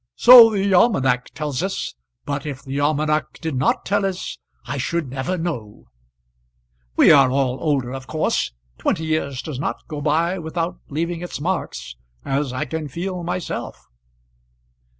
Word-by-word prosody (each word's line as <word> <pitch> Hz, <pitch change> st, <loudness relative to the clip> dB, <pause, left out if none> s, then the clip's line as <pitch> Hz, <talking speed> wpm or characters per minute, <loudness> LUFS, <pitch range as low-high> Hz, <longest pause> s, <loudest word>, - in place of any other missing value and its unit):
"So 240 Hz, -2 st, +10 dB
the 200 Hz, -2 st, 0 dB
almanac 135 Hz, -, +3 dB
tells 150 Hz, -2 st, -2 dB
us; 190 Hz, +1 st, -3 dB, 0.3 s
but 140 Hz, -1 st, -3 dB
if 140 Hz, -4 st, -6 dB
the 135 Hz, 0 st, -4 dB
almanac 150 Hz, +1 st, +1 dB
did 160 Hz, -2 st, -3 dB
not 130 Hz, +4 st, +1 dB
tell 200 Hz, 0 st, +1 dB
us 190 Hz, -2 st, -3 dB, 0.3 s
I 130 Hz, +3 st, -4 dB
should 155 Hz, 0 st, -2 dB
never 135 Hz, +8 st, -2 dB
know. 145 Hz, -12 st, -5 dB, 1.1 s
We -, -, +7 dB
are 135 Hz, -2 st, +7 dB
all 130 Hz, -1 st, 0 dB
older, 135 Hz, -5 st, 0 dB
of 135 Hz, -1 st, -7 dB
course. 155 Hz, -, 0 dB, 0.3 s
Twenty 160 Hz, -, 0 dB
years 150 Hz, -4 st, -2 dB
does 150 Hz, -5 st, -5 dB
not -, -, -4 dB
go 150 Hz, -1 st, -5 dB
by 165 Hz, +5 st, +1 dB
without 165 Hz, +1 st, -3 dB
leaving 165 Hz, +3 st, -2 dB
its 175 Hz, -, -5 dB
marks, 145 Hz, -, -3 dB, 0.3 s
as 140 Hz, 0 st, -1 dB
I 130 Hz, -, -2 dB
can 160 Hz, -2 st, -4 dB
feel 180 Hz, +5 st, -4 dB
myself." 175 Hz, 0 st, -4 dB
155 Hz, 150 wpm, -21 LUFS, 135-175 Hz, 1.1 s, So